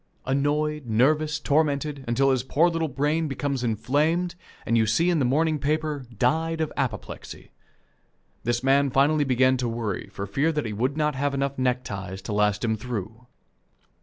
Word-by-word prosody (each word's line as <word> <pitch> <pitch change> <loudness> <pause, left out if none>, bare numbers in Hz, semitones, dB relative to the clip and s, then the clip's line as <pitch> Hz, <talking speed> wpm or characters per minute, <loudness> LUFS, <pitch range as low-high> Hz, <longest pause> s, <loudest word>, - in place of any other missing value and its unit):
Annoyed, 145 +1 0
nervous, 150 +7 +2
tormented, 145 -1 0
until 135 +3 +3
his 130 -2 +1
poor 150 +7 +2
little 165 -1 -1
brain 150 +4 0
becomes 140 -2 -2
inflamed, 145 - +1 0.3
and 115 - +1
you 110 -1 +3
see 165 +11 +2
in 170 - +1
the 135 - +2
morning 155 +4 +1
paper, 150 -1 -1
"Died 160 +7 +1
of 160 -1 -2
apoplexy." 115 -6 -5 0.9
This 120 +1 -1
man 140 +1 +4
finally 145 +3 +3
began 130 0 +3
to 125 -1 -1
worry 115 -5 -3
for 100 - -5
fear 135 +11 +1
he 110 - -3
would 130 +7 -1
not 150 -1 +1
have 140 +1 -1
enough 140 0 -2
neckties 100 -7 -2
to 105 - -4
last 105 +1 +1
him 110 -1 +1
through. 115 +1 -6
135 Hz, 165 wpm, -25 LUFS, 120-150 Hz, 0.9 s, man